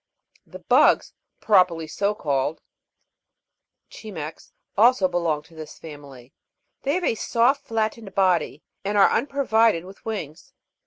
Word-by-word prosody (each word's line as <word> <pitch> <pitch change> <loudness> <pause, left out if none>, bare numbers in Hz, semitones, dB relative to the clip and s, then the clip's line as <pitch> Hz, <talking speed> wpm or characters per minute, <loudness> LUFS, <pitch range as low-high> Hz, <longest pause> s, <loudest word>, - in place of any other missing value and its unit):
5. - - -28
The - - -8
bugs, - - +4 0.3
properly 180 -6 +3
so 200 +6 -1
called 140 -2 -1 1.3
(Cimex), 165 -8 -9 0.2
also 225 -2 +4
belong 170 -4 -1
to 165 - -21
this 160 -1 -10
family; 140 -5 -12 0.5
they 280 +3 0
have 365 - -2
a - - +2
soft 240 +5 +1
flat 220 -1 0
tened 200 -5 -13
body, 180 -6 +1 0.2
and 205 +1 -1
are 200 - +6
unprovided 230 - +1
with 190 +1 -14
wings. 190 -9 -6
190 Hz, 135 wpm, -23 LUFS, 160-220 Hz, 1.3 s, are